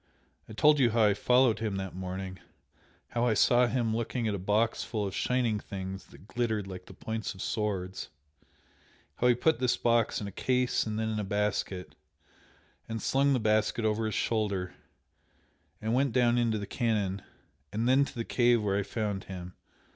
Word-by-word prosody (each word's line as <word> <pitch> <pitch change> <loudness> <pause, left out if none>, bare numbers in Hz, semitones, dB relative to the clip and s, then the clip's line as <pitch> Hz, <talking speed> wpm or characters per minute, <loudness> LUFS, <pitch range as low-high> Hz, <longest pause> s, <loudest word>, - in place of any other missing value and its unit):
I - - -8
told 150 +6 +5
you 125 -3 +5
how 115 0 +2
I 105 -1 +5
followed 125 +2 +3
him 110 -3 -2
that 95 -1 -4
morning 95 0 -5 0.7
how 120 +1 0
I 110 - +2
saw 120 +4 +4
him 120 -3 0
looking 115 0 -2
at 105 - 0
a 100 - -3
box 105 +4 +1
full 110 -3 -2
of 95 - -4
shining 120 -4 0
things 95 -1 -7
that - - -16
glittered 110 -4 -1
like 90 -1 -9
the - - -11
points 110 -2 -4
of 95 - -9
swords, 95 -4 -3 1.1
how 125 - +2
he 120 - +5
put 160 +6 +2
this 125 -1 +2
box 115 -1 +2
in 105 - -5
a 100 - -5
case 125 +3 0
and 110 0 -3
then 110 0 -1
in 110 -1 -2
a - - -1
basket, 100 -2 -2 1.0
and 115 0 -3
slung 140 +4 +2
the 130 - +2
basket 110 +1 +1
over 110 +1 +1
his 110 - -3
shoulder, 100 -5 -1 1.1
and 110 +1 -2
went 135 -1 +2
down 120 -1 +3
into 115 -2 +1
the 100 - -4
canon, 100 -4 -1 0.5
and 115 +3 -1
then 130 +2 +5
to 140 - -6
the 115 -1 -3
cave 120 -1 +3
where 100 -1 +1
I - - +1
found 100 -1 -3
him. 90 -1 -8
110 Hz, 190 wpm, -29 LUFS, 100-120 Hz, 1.1 s, told